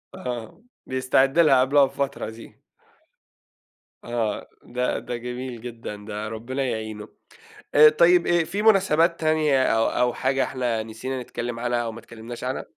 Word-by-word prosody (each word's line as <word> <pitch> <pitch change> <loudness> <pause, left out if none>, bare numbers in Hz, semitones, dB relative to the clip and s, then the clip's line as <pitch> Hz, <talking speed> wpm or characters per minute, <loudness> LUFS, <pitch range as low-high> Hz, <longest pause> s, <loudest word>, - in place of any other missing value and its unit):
آه، 125 - -6 0.2
بيستعد 130 +3 +1
لها 135 -6 +6
قبلها 140 +1 +4
بفترة 135 -4 -3
دي. 110 +1 -13 1.4
آه 115 -3 -2 0.2
ده 125 +1 -2
ده 120 - -5
جميل 125 0 -6
جدًا 115 -3 -7
ده 105 +1 -6
ربنا 120 +5 -4
يعينه. 110 -4 -4 0.7
آآ، 150 +1 +9
طيب 170 +3 +4
آآ 175 -1 +3
في 200 +6 -3
مناسبات 180 -6 +3
تانية 155 -4 +2
أو 115 -2 +2
أو 125 -1 +1
حاجة 135 0 0
إحنا 120 -4 -2
نسينا 125 +4 -5
نتكلم 120 -1 -5
عنها 120 0 0
أو 115 -1 -4
ما 115 - -10
اتكلمناش 115 +1 -9
عنها؟ 130 +1 -3
125 Hz, 145 wpm, -24 LUFS, 115-140 Hz, 1.4 s, آآ